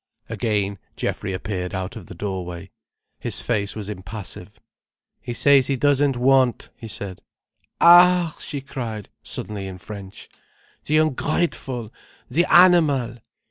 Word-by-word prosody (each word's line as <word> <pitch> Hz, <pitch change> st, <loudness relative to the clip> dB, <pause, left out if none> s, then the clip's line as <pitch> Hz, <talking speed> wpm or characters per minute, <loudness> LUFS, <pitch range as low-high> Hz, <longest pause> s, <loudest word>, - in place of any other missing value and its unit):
Again 100 Hz, -4 st, -1 dB, 0.2 s
Geoffrey 95 Hz, -, -3 dB
appeared 95 Hz, -1 st, -4 dB
out 95 Hz, +5 st, -4 dB
of 110 Hz, -6 st, -10 dB
the -, -, -10 dB
doorway. 90 Hz, -1 st, -5 dB, 0.5 s
His -, -, +1 dB
face 100 Hz, -4 st, -1 dB
was 105 Hz, -2 st, -5 dB
impassive. 100 Hz, 0 st, -8 dB, 0.6 s
"He -, -, -6 dB
says 135 Hz, +1 st, +4 dB
he 140 Hz, -, +1 dB
doesn't 140 Hz, 0 st, +2 dB
want," 130 Hz, -1 st, +2 dB
he 115 Hz, -, -10 dB
said. 100 Hz, -3 st, -5 dB, 0.6 s
"Ah!" 175 Hz, -1 st, +6 dB
she 140 Hz, -, -5 dB
cried 115 Hz, -6 st, -6 dB
suddenly 100 Hz, -2 st, -4 dB
in 95 Hz, -1 st, -8 dB
French, 100 Hz, 0 st, -10 dB, 0.6 s
"the 155 Hz, -, +2 dB
ungrateful, 135 Hz, -5 st, -1 dB, 0.4 s
the 170 Hz, +7 st, +3 dB
animal! 150 Hz, -10 st, +5 dB
115 Hz, 125 wpm, -22 LUFS, 100-140 Hz, 0.6 s, Ah